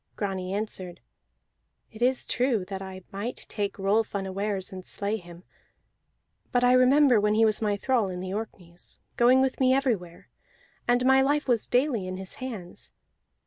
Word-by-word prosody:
Grani 190 -2 -3
answered: 190 -4 -4 0.9
"It 220 - -13
is 255 +1 +2
true 245 -6 0
that 190 0 -6
I 190 -1 -8
might 205 +5 -5
take 205 -2 -3
Rolf 205 +3 +1
unawares, 195 0 -3
and 185 -1 -7
slay 205 +3 -3
him. 175 -2 -13 1.1
But 245 -1 +2
I 245 0 +5
remember 255 -1 +5
when 210 +1 +2
he 225 +1 +5
was 215 0 +1
my 205 -2 +1
thrall 235 -3 +1
in 180 -1 -5
the 185 +1 -5
Orkneys, 180 -5 -7 0.2
going 250 +2 +5
with 265 -1 0
me 260 0 +4
everywhere, 215 -11 -2 0.6
and 245 +1 +3
my 265 0 +6
life 290 +2 +1
was 240 -4 +1
daily 245 -7 +1
in 185 0 -4
his 190 0 -6
hands. 215 -9 -7
210 Hz, 165 wpm, -27 LUFS, 190-250 Hz, 1.1 s, my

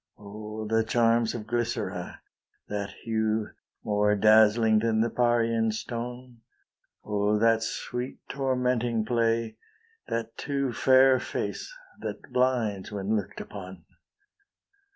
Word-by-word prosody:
O, 105 +1 -7
the 110 +1 +2
charms 115 0 +2
of 110 -3 -5
Glycera, 120 +1 -3 0.5
That 100 -1 -3
hue, 110 -1 0 0.3
more 105 0 +2
dazzling 110 +1 +5
than 110 0 +1
the 115 - +1
Parian 115 -2 +2
stone! 120 +2 -6 0.6
O, 105 0 +1
that 115 +1 +3
sweet 125 +3 -4
tormenting 125 -4 0
play, 115 -1 0 0.5
That 115 0 -3
too 140 -3 -2
fair 130 0 +5
face, - - -4 0.3
that - - -7
blinds 120 -7 +1
when 100 +1 -1
look'd 105 -3 -4
upon! 95 -4 -9
115 Hz, 110 wpm, -27 LUFS, 105-120 Hz, 0.6 s, dazzling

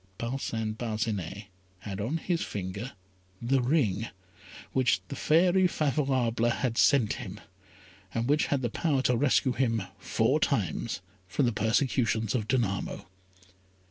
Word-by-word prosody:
Parcin 115 -3 -2
Parcinet 110 -4 -3 0.4
had 100 -1 -5
on 130 +10 -1
his 170 +1 -1
finger 100 +6 -4 0.5
the 130 +3 +2
ring 120 - +1 0.6
which 130 -6 +2
the - - -4
fairy 180 +4 +4
Favourable 130 -7 +1
had 120 0 -1
sent 125 -4 +4
him, 100 -3 -7 0.7
and 115 +2 -1
which 150 +2 +3
had 140 -2 0
the 120 - +1
power 140 -3 +1
to 125 - +3
rescue 130 +1 +3
him 115 -5 +1 0.2
four - - +1
times 110 -4 -1 0.3
from 130 +9 +1
the 120 - +2
persecutions 110 -1 +1
of 110 -5 -1
Danamo. 110 -7 -1
120 Hz, 130 wpm, -29 LUFS, 110-135 Hz, 0.7 s, fairy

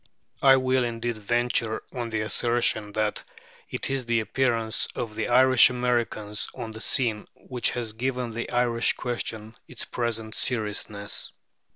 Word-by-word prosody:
I 135 -1 +7
will 130 0 +2
indeed 120 -1 -3
venture 115 0 0
on 120 -2 -3
the 110 -1 -1
assertion 110 -1 +1
that 110 0 -1 0.5
it - - -3
is 135 -3 -2
the 115 -1 +2
appearance 115 0 +1
of 115 -3 -4
the 110 0 -2
Irish 130 0 +7
Americans 120 -4 -1
on 115 - -6
the 110 0 -7
scene 115 -6 +1
which 125 -3 -1
has 115 -3 -2
given 125 +1 -2
the 120 +1 -4
Irish 120 -1 +2
question 110 -3 -4
its - - -6
present 115 -2 -3
seriousness. 105 -4 -2
115 Hz, 145 wpm, -26 LUFS, 110-125 Hz, 0.5 s, I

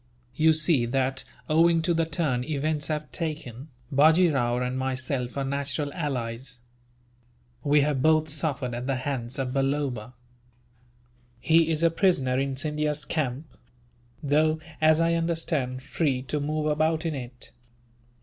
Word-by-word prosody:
You 160 +4 +4
see 155 -6 +2
that, 130 +1 -1 0.2
owing 165 +1 +4
to 170 +1 +2
the 165 -1 +1
turn 150 -7 -1
events 150 +1 -2
have 150 -1 -3
taken, 150 -5 -5 0.2
Bajee 160 +4 +5
Rao 120 -3 +1
and 125 0 -2
myself 130 0 -3
are 140 - 0
natural 140 +1 -2
allies. 125 -5 -4 1.0
We 145 0 +4
have 140 -2 0
both 155 +1 +3
suffered 145 -4 -2
at 120 +2 -4
the 135 - +1
hands 130 -2 -4
of 130 -2 -2
Balloba. 135 -4 -1 1.3
He 160 +6 +3
is 160 0 0
a 165 - +4
prisoner 135 -9 +2
in 135 0 -1
Scindia's 150 +1 -1
camp; 145 -2 -2 0.8
though, 155 +2 +2 0.2
as 155 0 +5
I 165 0 +2
understand, 160 -6 -1
free 140 -3 -1
to 150 +3 -2
move 150 +1 -2
about 155 +2 +1
in 165 - -1
it. 125 -3 -7
145 Hz, 140 wpm, -26 LUFS, 130-155 Hz, 1.3 s, Bajee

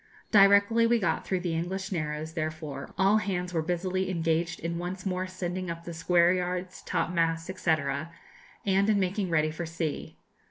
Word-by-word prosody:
Directly 200 +2 +6
we 235 +1 +4
got 170 -7 -1
through 185 -2 0
the 175 -2 -2
English 190 +4 -3
Narrows, 155 -2 -3
therefore, 155 -4 -4
all 195 +2 +4
hands 180 -3 -2
were 165 - +1
busily 180 +3 -1
engaged 165 -1 0
in 170 +1 -3
once 180 +2 -5
more 185 -1 -1
sending 185 0 -4
up 170 0 -5
the 170 - -7
square 170 +2 +3
yards, 180 0 -3
top - - -1
masts, 165 0 0
&c., 165 - +3 0.9
and 195 +1 +3
in 210 -2 +3
making 190 0 0
ready 155 -2 +2
for 165 +1 -5
sea. 165 -2 -4
180 Hz, 170 wpm, -28 LUFS, 165-190 Hz, 0.9 s, Directly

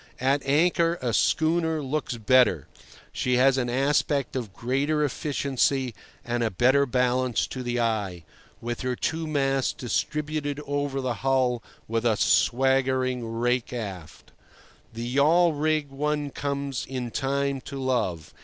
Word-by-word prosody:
At 135 +3 +2
anchor 170 +3 +3
a 120 -2 -2
schooner 160 +4 +1
looks 135 -2 -2
better; 115 - +3 0.5
she 125 0 0
has 135 +1 +4
an 120 -1 -1
aspect 140 +1 +1
of 120 -6 -3
greater 140 +8 0
efficiency 135 -2 0 0.3
and 120 0 -1
a 115 - +1
better 130 +8 +3
balance 125 0 +1
to 130 - -6
the 120 -1 -2
eye, 105 -7 -1 0.4
with 120 +1 -4
her 125 -1 -1
two 160 +5 -2
masts 135 -3 +1
distributed 150 +3 -2
over 145 -1 -2
the 130 -2 -1
hull 130 -3 +1 0.3
with 115 +1 -1
a 115 -3 +2
swaggering 130 -1 +2
rake 120 +1 0
aft. 100 -9 -7 0.6
The 115 +1 -6
yawl 155 +7 +4
rig 150 -1 0
one 145 +1 -2
comes 140 -2 -3
in 125 -2 -4
time 140 +1 -1
to 140 -1 -6
love. 110 - -1
130 Hz, 135 wpm, -26 LUFS, 120-145 Hz, 0.6 s, has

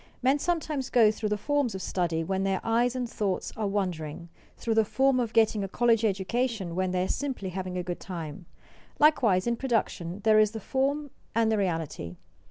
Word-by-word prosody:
Men 270 +3 +3
sometimes 305 -5 -1
go 225 -4 +5
through 215 0 -3
the 210 - 0
forms 280 0 0
of 190 - -5
study 170 -3 -1
when 190 +3 -1
their 195 -1 +1
eyes 235 +2 +2
and 250 -1 -2
thoughts 200 -4 -2
are 215 -2 -1
wandering; 170 -5 -3 0.3
through 230 - -1
the 220 0 +4
form 265 +4 +2
of 235 -3 -1
getting 220 -2 +3
a - - -2
college 230 +2 +2
education 210 -1 -1
when 185 +1 0
they 180 0 0
are - - -1
simply 260 -8 -3
having 185 0 -4
a 180 - -2
good 175 0 -4
time. 170 -1 -7 0.5
Likewise 260 -12 +4
in 235 0 0
production 205 -8 -1
there 215 -1 +5
is 215 -1 +5
the 220 - -4
form 275 +5 -1 0.2
and 225 -1 +3
the 220 - +2
reality. 165 - -2
215 Hz, 195 wpm, -28 LUFS, 185-245 Hz, 0.5 s, go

